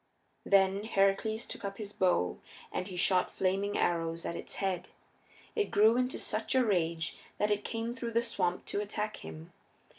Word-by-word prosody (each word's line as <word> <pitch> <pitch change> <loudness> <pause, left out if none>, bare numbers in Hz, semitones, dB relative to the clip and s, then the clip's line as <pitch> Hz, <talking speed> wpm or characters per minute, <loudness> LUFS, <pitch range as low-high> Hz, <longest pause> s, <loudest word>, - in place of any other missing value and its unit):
Then 195 +1 +4
Heracles 215 +2 +2
took - - -7
up 195 0 -4
his 210 -2 -6
bow 175 - +2 0.3
and 185 - -2
he 185 -2 -7
shot 185 0 +3
flaming 195 +2 0
arrows 165 -1 0
at 170 - -2
its - - -6
heads. 185 -2 -2 0.7
It 425 -2 +1
grew 220 +3 +5
into 250 +1 +1
such 220 +4 -1
a 260 -1 +5
rage 165 -5 0 0.2
that 210 0 +1
it 205 0 +1
came 230 +1 -3
through 235 -2 -5
the 235 +1 +3
swamp 185 -6 -1
to 205 - -1
attack 210 +1 -3
him. 80 0 -10
200 Hz, 175 wpm, -32 LUFS, 180-220 Hz, 0.7 s, grew